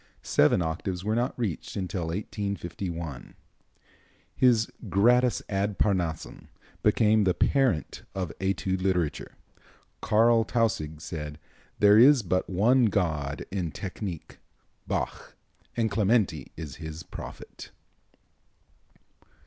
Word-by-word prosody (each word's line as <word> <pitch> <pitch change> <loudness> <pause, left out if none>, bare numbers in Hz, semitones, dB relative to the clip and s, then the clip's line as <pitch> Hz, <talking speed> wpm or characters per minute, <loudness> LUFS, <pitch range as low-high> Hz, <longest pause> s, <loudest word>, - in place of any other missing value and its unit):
Seven 75 +4 +3
octaves 90 +3 -3
were 105 +2 0
not 120 +2 -1
reached 110 -9 -3
until 90 -3 -3
1851. 85 - -5 1.0
His 120 -3 +3 0.2
"Gradus 120 +5 +3
ad 100 0 -1
Parnassum" 85 -6 -1 0.3
became 110 -1 +4
the 90 -2 +2
parent 130 - +1
of 90 -6 -3
Etude 95 -1 -1
literature. 90 -5 -1 0.7
Carl 115 +1 +4
Tausig 105 -11 -1
said: 75 -2 -6 0.4
"There 105 +1 +6
is 130 0 +7
but 95 0 -1
one 115 +7 +4
god 80 -9 -1
in 90 -4 -2
technique, 90 0 -7 0.5
Bach, - - -3 0.4
and 115 -2 +1
Clementi 100 - +1
is 75 -4 -7
his 80 +1 -7
prophet." - - -10
95 Hz, 100 wpm, -27 LUFS, 85-110 Hz, 1.0 s, is